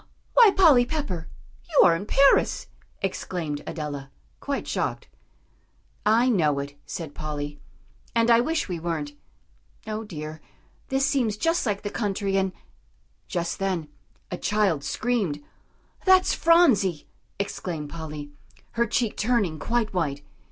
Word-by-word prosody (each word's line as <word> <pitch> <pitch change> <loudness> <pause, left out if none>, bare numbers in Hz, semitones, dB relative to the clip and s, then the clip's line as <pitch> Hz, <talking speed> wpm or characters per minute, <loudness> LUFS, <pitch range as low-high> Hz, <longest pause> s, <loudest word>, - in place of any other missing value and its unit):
"Why, 470 -3 +8
Polly 325 -11 +6
Pepper! 245 - -4 0.4
You 310 - +5
are 170 - +5
in 195 +5 -5
Paris!" 275 +4 +4 0.4
exclaimed 170 -6 -3
Adela, 145 -3 -5 0.3
quite - - -3
shocked. - - -2 1.0
"I 230 +4 +4
know 160 - +2
it," 140 0 -4
said 160 -4 -6
Polly, 145 -1 -5 0.6
"and 230 0 +4
I 230 - +7
wish 315 +6 0
we 175 -3 -4
weren't. 160 -3 -3 0.7
O 215 0 -4
dear! 155 -5 -7 0.5
this 270 0 +1
seems 245 -7 +1
just 330 +2 +1
like 205 -1 -1
the 205 - -3
country, 200 -2 -1
and 190 -1 +1 0.4
" - - -40
Just 170 0 -2
then 185 -6 -1 0.4
a 180 - -4
child 200 -9 +1
screamed. 195 -7 -1 0.6
"That's 375 -1 +5
Phronsie!" 250 - +4 0.3
exclaimed 170 -6 -4
Polly, 150 -3 -7 0.4
her 235 0 +1
cheek 230 0 0
turning 210 -9 +1
quite 230 +1 -1
white. 145 -5 -2
195 Hz, 130 wpm, -25 LUFS, 155-235 Hz, 1.0 s, Why